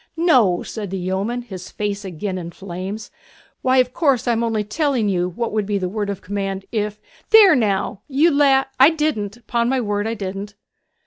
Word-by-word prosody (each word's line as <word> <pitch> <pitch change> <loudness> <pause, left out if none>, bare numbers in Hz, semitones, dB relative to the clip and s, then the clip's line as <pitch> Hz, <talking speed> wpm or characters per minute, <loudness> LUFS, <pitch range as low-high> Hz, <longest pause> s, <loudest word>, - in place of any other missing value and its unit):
'No!' 250 - +3
said 210 -3 -6
the 195 - -3
yeoman, 195 +7 -2
his 185 -6 -9
face 205 -1 -3
again 185 +1 -4
in 170 -1 -6
flames. 190 +4 -7 0.5
'Why, 260 0 +2
of 250 0 +3
course 275 -7 +1
I - - +4
am 230 0 0
only 225 -2 0
telling 250 -1 0
you 180 -2 0
what 230 +6 -3
would 210 -2 0
be 205 -1 0
the 185 -2 -2
word 205 +1 -3
of 200 - -5
command 195 0 -3
if 210 -2 -2 0.3
there 425 -5 +8
now! 200 -3 0
you 300 +5 +3
la 280 -2 +4
' - - -40
'I 270 +3 +9
didn't; 240 -8 -2
'pon 235 +1 0
my 265 0 +1
word 205 -2 -1
I 225 - -2
didn't!' 200 0 -6
210 Hz, 200 wpm, -21 LUFS, 195-250 Hz, 0.5 s, I